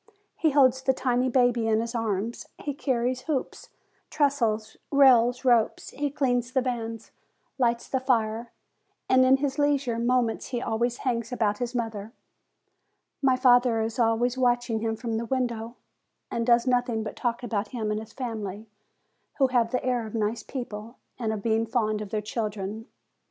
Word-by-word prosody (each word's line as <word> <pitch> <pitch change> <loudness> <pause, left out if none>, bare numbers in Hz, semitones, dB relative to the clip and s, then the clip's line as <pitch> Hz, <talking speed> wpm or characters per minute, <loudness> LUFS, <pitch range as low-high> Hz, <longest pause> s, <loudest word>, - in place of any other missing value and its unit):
He 320 - +2
holds 265 -3 +4
the 265 0 +2
tiny 250 0 +1
baby 245 -2 +2
in 220 -1 +3
his 230 +1 -3
arms; 225 -1 -2
he 290 - -4
carries 255 -2 -1
hoops, 275 -1 -4 0.4
trestles, 230 -8 0
rails, 250 -3 +5
ropes; 240 -3 +2
he 290 0 -2
cleans 245 -3 0
the 260 - +3
vans, 230 -3 -4 0.5
lights 235 -2 +1
the 265 - 0
fire, 230 -3 0 0.6
and 260 0 +5
in 260 +1 +5
his 280 +1 -2
leisure 280 -5 +1
moments 240 -1 +1
he 245 - -3
always 235 +1 -1
hangs 235 -2 -1
about 210 -4 0
his 245 0 -3
mother. 225 -2 -4 1.1
My 265 -2 +4
father 245 -2 +4
is 225 +2 -2
always 240 +2 +2
watching 245 -2 +1
him 225 0 -1
from 225 -1 -3
the 230 - -3
window, 235 -2 -2 0.6
and 230 0 -2
does 235 0 +4
nothing 245 -3 +1
but 215 - -6
talk 240 0 -2
about 215 -3 -2
him 220 -2 -3
and 210 - -1
his 220 0 -10
family, 220 -5 -5 0.7
who 270 -2 +3
have 240 -3 +2
the 250 +1 -2
air 245 -3 0
of 215 - -8
nice 220 +1 -1
people, 230 -3 -7 0.2
and 225 -3 -1
of 210 -2 -4
being 225 0 +1
fond 215 -3 0
of 210 - -6
their 210 0 -2
children. 215 0 -4
235 Hz, 165 wpm, -26 LUFS, 225-255 Hz, 1.1 s, rails